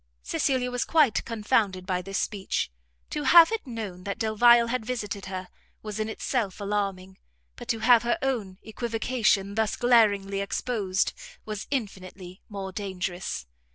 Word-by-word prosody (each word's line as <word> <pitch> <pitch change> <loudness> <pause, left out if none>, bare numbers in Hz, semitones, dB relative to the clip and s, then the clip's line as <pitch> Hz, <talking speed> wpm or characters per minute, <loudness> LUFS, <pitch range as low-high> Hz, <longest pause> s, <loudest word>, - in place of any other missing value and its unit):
Cecilia 250 - 0
was 245 -1 0
quite 300 -9 +3
confounded 210 -4 0
by 185 -1 -1
this 195 +1 -4
speech; 195 - -2 0.4
to 300 - -2
have 330 +6 +7
it 450 -10 -3
known 210 -7 -6
that 200 0 -4
Delvile 235 +2 +5
had 235 0 -2
visited 210 -4 -4
her, 185 -1 -5 0.4
was 215 0 -5
in 215 0 -1
itself 220 -3 -2
alarming, 195 -2 -3 0.4
but - - -10
to 225 - 0
have 235 0 +6
her 240 +7 0
own 220 -9 -2
equivocation 220 -3 0
thus 220 0 0
glaringly 205 -5 +3
exposed, 200 -2 -1 0.3
was 215 -2 -5
infinitely 190 -7 -5
more 195 -2 -5
dangerous. 185 - -4
210 Hz, 145 wpm, -27 LUFS, 195-235 Hz, 0.4 s, have